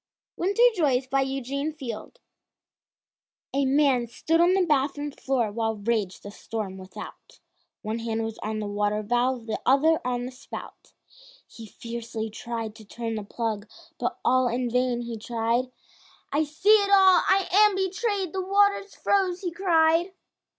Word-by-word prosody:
WINTER 400 +6 +1
JOYS 275 - +1
BY 270 +1 +1
EUGENE 270 +3 -2
FIELD 260 - -7 1.3
A 275 0 +1
man 270 -3 +3
stood 325 +8 +1
on 355 +2 +4
the 380 -2 +3
bathroom 290 -1 0
floor, 260 -6 -1
While 225 +1 -1
raged 210 -2 -2
the 205 - -8
storm 205 -3 -6
without, 185 0 -11 0.4
One 220 +1 -3
hand 225 -1 -2
was 225 0 -5
on 215 0 -3
the 215 - -3
water 205 +1 -1
valve, 245 +2 0
The 220 - -4
other 305 +5 +4
on 245 -1 -2
the 255 - -6
spout. 255 +2 -10 0.5
He 225 -1 -11
fiercely 230 0 -6
tried 230 -1 -5
to 220 - -13
turn 225 +2 -5
the 215 -1 -4
plug, 215 0 -4 0.3
But - - -2
all 255 0 +4
in 240 0 -1
vain 250 0 +1
he 235 -2 -6
tried, 235 +3 -1 0.6
"I 305 +2 +2
see 375 +9 +4
it 400 - -1
all, 380 -2 +7
I 380 -1 +3
am 415 +1 +5
betrayed, 385 -1 -1
The 380 - -1
water's 400 +1 +2
froze," 375 -3 +1
he 360 -3 -3
cried. 340 0 +2
255 Hz, 155 wpm, -26 LUFS, 225-340 Hz, 1.3 s, all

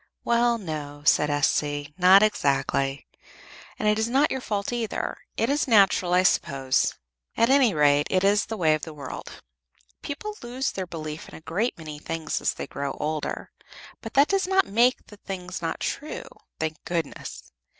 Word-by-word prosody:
"Well, 235 0 +2
no," 150 -6 -6
said 150 +1 +4
S.C. 145 0 0
"Not 185 +2 +7
exactly. 140 -7 0 0.7
And 215 - -1
it 210 +1 +3
is 220 +1 0
not 275 +4 +3
your 265 - -2
fault 205 0 -2
either. 235 -3 -2 0.2
It 225 - +1
is 285 +2 +1
natural, 195 -5 +4
I 180 - +4
suppose; 135 -7 +1 0.4
at 230 +3 +4
any 270 -5 +5
rate, 145 -1 +4
it 185 0 +2
is 200 +1 +3
the 220 - -4
way 160 -4 +3
of 155 - -1
the 160 0 -7
world. 140 -3 -8 0.6
People 420 +9 -5
lose 250 +3 -2
their 190 -1 -5
belief 155 -2 -7
in - - -12
a - - -11
great 205 +10 -1
many 155 -2 -8
things 165 +1 -3
as - - 0
they - - -5
grow 140 0 -4
older; 155 0 -4 0.5
but - - -9
that 280 +2 +6
does 390 -1 +1
not 385 0 +3
make 240 +5 +2
the 210 - -14
things 185 -2 -6
not 165 - -3
true, 300 +2 -4 0.4
thank 160 0 -3
goodness! 165 -4 -5
185 Hz, 175 wpm, -25 LUFS, 150-235 Hz, 0.7 s, Not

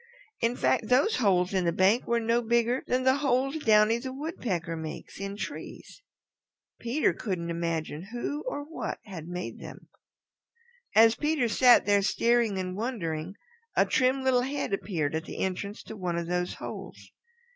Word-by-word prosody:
In 230 +1 +1
fact, 225 - +1
those 265 - +3
holes 190 -5 +2
in 190 -1 +1
the 170 - +2
bank 190 +7 +3
were 235 0 +2
no 230 +1 +1
bigger 235 +2 +1
than 255 +1 +1
the 260 +1 +4
holes 275 +1 +1
Downy 220 -2 +4
the 260 +2 -5
Woodpecker 240 - -3
makes 160 +2 -7
in 195 +1 -5
trees. 215 - -8 0.8
Peter 245 +6 +1
couldn't 175 -6 -3
imagine 165 0 -3
who 265 +5 -3
or 290 -12 -3
what 315 +3 -5
had 175 -6 -8
made 180 +1 -5
them. - - -11 1.1
As 225 +1 +7
Peter 300 -2 0
sat 245 +2 +6
there 205 -1 +4
staring 225 +2 +2
and 185 -1 -3
wondering 190 -7 -3 0.4
a - - +4
trim 260 +1 +2
little 255 -2 +3
head 275 -4 -3
appeared 165 -7 -1
at 160 +1 -2
the - - -8
entrance 200 +2 -3
to 220 - -9
one 180 -4 -2
of 170 - -2
those 180 +1 -2
holes. - - -9
220 Hz, 165 wpm, -28 LUFS, 180-250 Hz, 1.1 s, As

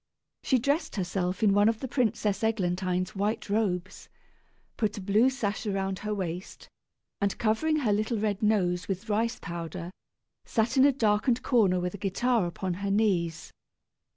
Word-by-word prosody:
She 260 - +2
dressed 290 +6 0
herself 185 +1 -2
in 200 -2 +5
one 205 +2 +5
of 225 -1 -1
the 265 - -4
Princess 220 -5 0
Eglantine's 185 -3 0
white 205 +1 -2
robes, 185 -4 -1 0.7
put 215 -2 -1
a - - -3
blue 210 +6 +3
sash 215 -4 -3
around 195 -1 -1
her 210 - -4
waist, 185 -3 -5 0.5
and 200 -1 0
covering 235 +9 +1
her 215 -6 +2
little 215 +3 0
red 205 0 -1
nose 180 -5 +1
with 195 +3 -4
rice 225 +2 0
powder, 170 +1 -6 0.5
sat 225 +2 0
in 265 0 +6
a 285 - +6
darkened 230 -1 +1
corner 200 -8 +3
with 180 0 -2
a 200 - -8
guitar 215 +1 +1
upon 180 +1 -3
her 200 - -1
knees. 185 -6 0
205 Hz, 160 wpm, -28 LUFS, 185-225 Hz, 0.7 s, in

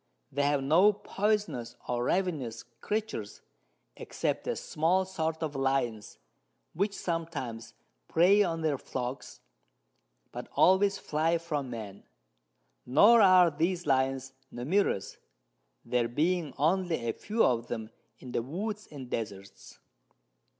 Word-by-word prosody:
They 145 - -1
have 140 -1 +1
no 170 +9 +5
poysonous 205 - -2
or 120 0 -1
ravenous 145 -12 -1
Creatures, 120 - -5 0.5
except - - -3
a - - 0
small 175 +5 +1
sort 160 -3 -3
of 150 -2 -3
Lions, 135 -5 -1 0.6
which 200 +4 -1
sometimes 160 -10 -4 0.3
prey 190 +5 +5
on 165 -4 0
their 150 -4 0
Flocks, 125 +1 -6 0.9
but - - -7
always 195 +2 +4
fly 160 +3 0
from 150 -5 -3
Men; 105 -5 -7 0.8
nor 210 - +6
are 185 -3 +6
these 170 +4 -1
Lions 135 -1 0 0.2
numerous, 140 - -1 0.7
there 120 -1 +1
being 155 +4 0
only 165 -4 +1
a 115 - 0
few 225 +2 0
of 120 -1 +1
them 110 -2 -5 0.3
in 125 - -10
the 120 - 0
Woods 205 - -5
and 135 -4 -8
Desarts. 100 -5 -6
150 Hz, 120 wpm, -29 LUFS, 125-185 Hz, 0.9 s, nor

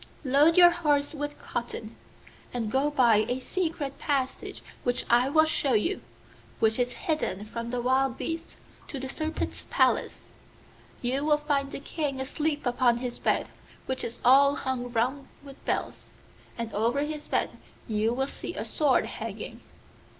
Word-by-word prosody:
Load 290 +5 +5
your 350 -1 +9
horse 295 -4 +1
with 290 -1 -4
cotton, 230 -2 -5 0.6
and 230 -3 -2
go 270 +4 +2
by 245 -7 +5
a 250 +1 0
secret 315 -3 -3
passage 270 -3 -2 0.2
which 245 0 0
I 245 +3 +5
will 315 +2 +5
show 285 -4 +1
you, 285 - +1 0.6
which 220 +1 +2
is 245 0 +1
hidden 305 - -1
from 230 +2 -5
the 245 0 -2
wild 260 0 +2
beasts, 330 +1 -4 0.3
to 280 - -5
the 265 - -4
Serpent's 310 +4 -3
palace. - - +1 0.7
You 260 +3 +1
will 300 0 +4
find 290 -2 0
the - - -6
King 280 -2 -3
asleep 295 +2 -2
upon 245 -1 +3
his 245 0 -5
bed, - - +1 0.4
which 260 0 -2
is 230 - -4
all 280 +3 +7
hung 245 -3 -3
round 255 +4 0 0.2
with 275 -1 -13
bells, - - -2 0.5
and 230 -2 -4
over 235 +7 +1
his 300 0 -4
bed - - 0 0.4
you 220 +1 +1
will 265 +3 0
see - - -6
a - - -3
sword 290 -4 +2
hanging. - - -6
270 Hz, 160 wpm, -28 LUFS, 245-295 Hz, 0.7 s, your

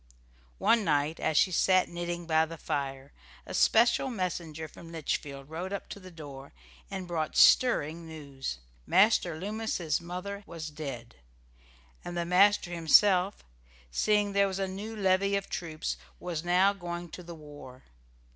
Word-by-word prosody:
One 230 - +3
night, 150 -1 +1
as 160 -2 0
she 185 - +4
sat 185 +1 +3
knitting 175 0 -4
by 160 -1 +3
the 165 +1 -8
fire, 135 -2 -4 0.3
a - - -8
special 235 +4 +4
messenger 170 -7 -4
from 165 +2 -13
Litchfield 140 -3 -4
rode 170 +5 -5
up 200 - -4
to - - -7
the 185 -1 -12
door 145 - -10 0.4
and 190 -2 -5
brought 160 -3 -2
stirring 165 -9 +4
news. 140 - -6 0.3
Master 190 -5 +4
Loomis's 200 -6 -2
mother 180 +4 -6
was 160 -2 -7
dead, 135 -6 -7 0.9
and 175 0 -6
the 170 - -1
master 190 +1 +4
himself, 180 +3 +4 0.5
seeing 210 - +2
there 200 0 +4
was 190 -1 -4
a 195 -1 -1
new 205 +4 -6
levy 195 0 +2
of 200 0 -3
troops, 160 -2 -3 0.2
was 170 -3 -4
now 180 +3 +4
going 175 -2 -6
to 180 - -9
the 170 -1 -9
war. 145 -4 -12
175 Hz, 150 wpm, -29 LUFS, 155-195 Hz, 0.9 s, she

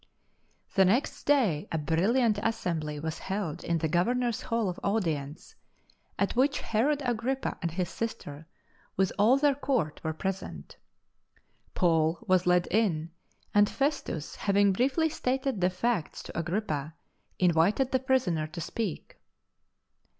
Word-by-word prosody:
The 195 - +5
next 220 +10 +1
day 230 - +2
a 160 - 0
brilliant 205 - +2
assembly 165 -10 -2
was 160 +1 -4
held 190 -4 -4
in 170 - 0
the 160 - 0
Governor 240 +10 +1
s 225 - -4
Hall 230 -2 -1
of 180 - -4
Audience, 165 - -2 0.6
at 200 - 0
which 275 +4 +2
Herod 280 +6 +1
Agrippa 245 +3 -1
and 170 - -1
his 175 +2 -2
sister, 160 -9 -6 0.5
with 190 0 +2
all 230 +6 +5
their 285 0 +3
Court, 260 - -1
were 160 - -1
present. 185 - -5 1.0
Paul 165 -2 +2
was 185 -1 +3
led 180 0 +3
in, 170 -6 +1 0.4
and 205 0 +5
Festus, 275 - -2
having 200 -1 +3
briefly 270 - +2
stated 265 -6 -1
the 180 - +4
facts 185 -1 -2
to - - -10
Agrippa, 160 -4 -2 0.4
invited 180 +9 +3
the 260 - +2
prisoner 245 -12 +1
to 170 +3 -8
speak. 195 +1 -4
195 Hz, 135 wpm, -29 LUFS, 165-240 Hz, 1.0 s, The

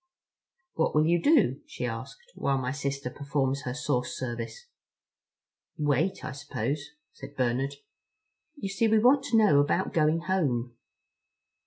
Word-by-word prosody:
"What 160 - 0
will 155 0 +4
you 170 +1 +3
do?" 315 - +3
she - - -5
asked, 480 0 -7
"while 140 -1 0
my 130 -1 -2
sister 140 -2 -3
performs 140 -1 -1
her 125 0 -3
source 140 -4 -1
service?" 120 - -5 1.1
"Wait, 150 +6 0
I - - -4
suppose," 145 +1 -4 0.2
said 140 +1 -11
Bernard. 130 +2 0 0.8
"You 200 -9 -5
see 210 +4 +1
we 220 0 +4
want 260 +5 +5
to 230 - +2
know 205 -10 +5
about 160 +6 +1
going 155 +1 +2
home." 130 -11 -1
145 Hz, 140 wpm, -28 LUFS, 135-190 Hz, 1.1 s, want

